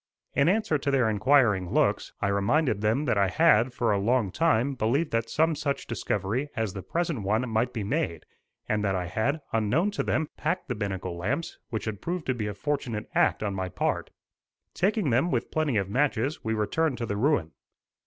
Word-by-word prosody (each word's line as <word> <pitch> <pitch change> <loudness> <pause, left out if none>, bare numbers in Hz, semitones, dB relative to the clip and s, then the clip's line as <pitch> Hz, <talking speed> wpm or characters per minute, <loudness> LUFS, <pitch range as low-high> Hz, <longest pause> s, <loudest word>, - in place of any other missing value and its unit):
In 140 +3 +3
answer 200 -7 +1
to 140 - -2
their 135 -4 +3
inquiring 105 -5 +3
looks, - - +1
I 100 - +1
reminded 100 +4 +1
them 110 +8 +1
that 110 -6 +1
I 100 - +4
had, 125 - +4
for 120 -2 0
a 100 - +2
long 110 -1 +1
time, 140 - +2
believed 135 +7 0
that 115 0 0
some 160 +1 +2
such 145 -2 -2
discovery 115 +4 -2
as 110 -4 -1
the 95 - -5
present 165 - -2
one 110 +6 0
might 115 +2 0
be 115 -4 -3
made, 110 - -2 0.4
and 105 0 0
that 95 -2 +1
I 90 -1 -1
had, 110 - -1
unknown 120 - +2
to - - -2
them, 155 -1 0
packed 165 +2 -2
the - - +1
binnacle 95 -5 -4
lamps 130 - -3
which 110 -3 -3
had 110 -2 -4
proved 175 -1 -3
to 130 - +1
be 110 -4 -3
a 105 - -4
fortunate 120 -3 -3
act - - +2
on 100 -2 -1
my 95 -1 -3
part. - - -1 0.6
Taking 195 - +1
them, 130 +9 +2
with 125 -6 -1
plenty 155 -7 +1
of 100 -2 0
matches, 135 +4 0
we 110 0 -1
returned 130 +6 0
to 115 - -3
the 100 - -3
ruin. 105 - +1
115 Hz, 205 wpm, -27 LUFS, 105-145 Hz, 0.6 s, I